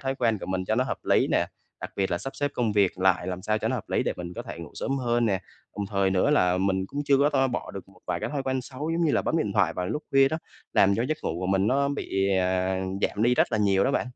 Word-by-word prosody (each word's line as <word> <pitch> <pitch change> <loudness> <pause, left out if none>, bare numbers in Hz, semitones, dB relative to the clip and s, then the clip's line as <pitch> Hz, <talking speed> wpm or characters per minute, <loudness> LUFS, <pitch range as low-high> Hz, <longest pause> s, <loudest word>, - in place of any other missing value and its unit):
thói 135 0 -2
quen 115 -5 +1
của - - -7
mình 95 0 -2
cho 110 - 0
nó 130 +2 +2
hợp - - -3
lý - - +3
nè, - - +2 0.3
đặc - - -6
biệt 95 -1 0
là 85 - 0
sắp 135 - -7
xếp 145 0 -1
công 115 -4 0
việc 100 -3 +2
lại 95 -1 +2
làm 90 0 -4
sao 110 +1 0
cho - - -1
nó - - 0
hợp - - -7
lý - - +1
để - - -1
mình 90 0 -6
có - - -5
thể - - -8
ngủ - - -8
sớm 135 0 -2
hơn 120 -2 +1
nè. 95 -3 +1 0.4
Đồng 100 - -2
thời 100 -1 +2
nữa 95 +10 +2
là 90 -10 +3
mình 95 0 +1
cũng 140 +8 -4
chưa 140 -1 +4
có 145 +1 +4
to 135 -2 +2
bỏ 125 - -4
được 95 -1 -9
một 95 -2 -20
vài - - -2
cái - - -3
thói 140 -2 -2
quen 130 -1 -1
xấu, 145 +5 -5
giống 170 +1 +1
như 150 - +2
là - - +2
bấm - - 0
điện 105 -10 -1
thoại 95 -5 +2
vào 90 +1 -3
lúc 150 +11 -3
khuya 135 0 +5
đó, 160 - -2 0.3
làm 100 0 +4
cho 115 - +1
giấc 155 - -1
ngủ 80 - -2
của 90 - -2
mình 95 +1 +2
nó 140 +3 +2
bị, 95 -8 -1
à, 95 0 +1 0.2
giảm 105 - 0
đi 125 +1 +4
rất 120 - +2
là 110 - +2
nhiều 100 -1 +3
đó 135 - +2
bạn. 130 - 0
105 Hz, 315 wpm, -26 LUFS, 95-135 Hz, 0.4 s, khuya